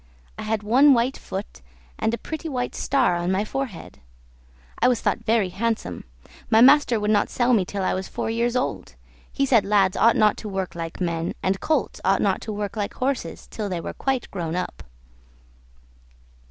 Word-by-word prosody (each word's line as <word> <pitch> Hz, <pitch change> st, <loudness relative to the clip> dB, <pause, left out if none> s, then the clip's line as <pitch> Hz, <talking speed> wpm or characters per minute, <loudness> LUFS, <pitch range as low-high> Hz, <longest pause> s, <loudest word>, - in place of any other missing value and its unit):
I -, -, -8 dB
had 215 Hz, 0 st, -2 dB
one 265 Hz, +6 st, +6 dB
white 240 Hz, +3 st, +1 dB
foot -, -, -7 dB, 0.4 s
and -, -, +1 dB
a 235 Hz, -, -2 dB
pretty 315 Hz, +7 st, -6 dB
white 250 Hz, -3 st, -2 dB
star 265 Hz, -10 st, +1 dB
on 175 Hz, +1 st, -1 dB
my 195 Hz, +3 st, 0 dB
forehead. 205 Hz, -, -5 dB, 0.8 s
I -, -, +4 dB
was 245 Hz, -3 st, +2 dB
thought -, -, 0 dB
very 220 Hz, -4 st, +2 dB
handsome; 200 Hz, -, -3 dB, 0.4 s
my 220 Hz, -, +5 dB
master 265 Hz, -2 st, +6 dB
would 210 Hz, 0 st, 0 dB
not 205 Hz, -, +2 dB
sell 245 Hz, 0 st, +2 dB
me 200 Hz, -5 st, +3 dB
till 195 Hz, +1 st, -4 dB
I -, -, +1 dB
was 190 Hz, 0 st, -3 dB
four -, -, -4 dB
years 235 Hz, +2 st, 0 dB
old; 250 Hz, -, -2 dB, 0.4 s
he 275 Hz, -, 0 dB
said 240 Hz, -6 st, +4 dB
lads 195 Hz, -1 st, +2 dB
ought 230 Hz, 0 st, +4 dB
not 210 Hz, -1 st, +3 dB
to 215 Hz, -, -7 dB
work 190 Hz, -2 st, -3 dB
like 165 Hz, -1 st, -6 dB
men, 170 Hz, -2 st, -2 dB
and 190 Hz, +1 st, 0 dB
colts 315 Hz, -, -1 dB
ought -, -, +3 dB
not -, -, +1 dB
to 220 Hz, -, -5 dB
work 205 Hz, 0 st, -4 dB
like 205 Hz, -2 st, -3 dB
horses 255 Hz, -10 st, -3 dB
till 210 Hz, -2 st, -4 dB
they 180 Hz, -2 st, -2 dB
were -, -, -6 dB
quite 265 Hz, -3 st, -2 dB
grown 170 Hz, -3 st, -3 dB
up. 180 Hz, -, -4 dB
215 Hz, 195 wpm, -24 LUFS, 185-245 Hz, 0.8 s, one